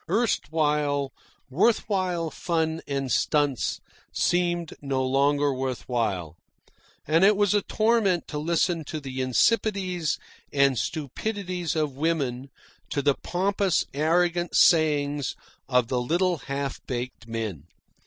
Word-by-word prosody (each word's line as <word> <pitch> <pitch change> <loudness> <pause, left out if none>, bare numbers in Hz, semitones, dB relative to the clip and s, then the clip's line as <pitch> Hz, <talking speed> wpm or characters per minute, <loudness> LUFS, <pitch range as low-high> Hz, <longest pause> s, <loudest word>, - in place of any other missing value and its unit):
Erstwhile 150 - +1 0.3
worth 185 - +2
while 180 -5 -1
fun 160 -1 -1
and 135 -2 -2
stunts 145 0 +1 0.3
seemed 175 -2 0
no 135 -2 -1
longer 140 +2 +2
worth 130 -1 -4
while; 95 -10 -1 0.7
and 160 +4 +3
it 205 +1 +6
was 205 -1 +3
a 205 - +3
torment 215 -5 +1
to 150 - -4
listen 165 +1 +1
to 155 - -5
the 130 -2 -5
insipidities 185 - +1 0.3
and 140 -2 +3
stupidities 180 - -3
of 150 -4 -1
women, 140 -5 -1 0.4
to 140 - -1
the 140 0 +4
pompous, 190 +2 0
arrogant 175 +4 +1
sayings 145 -4 +3 0.3
of 125 -3 +3
the 125 0 0
little 175 +7 +1
half 140 0 -3
baked 125 -2 -5
men. 110 -10 -4
150 Hz, 120 wpm, -26 LUFS, 135-175 Hz, 0.7 s, it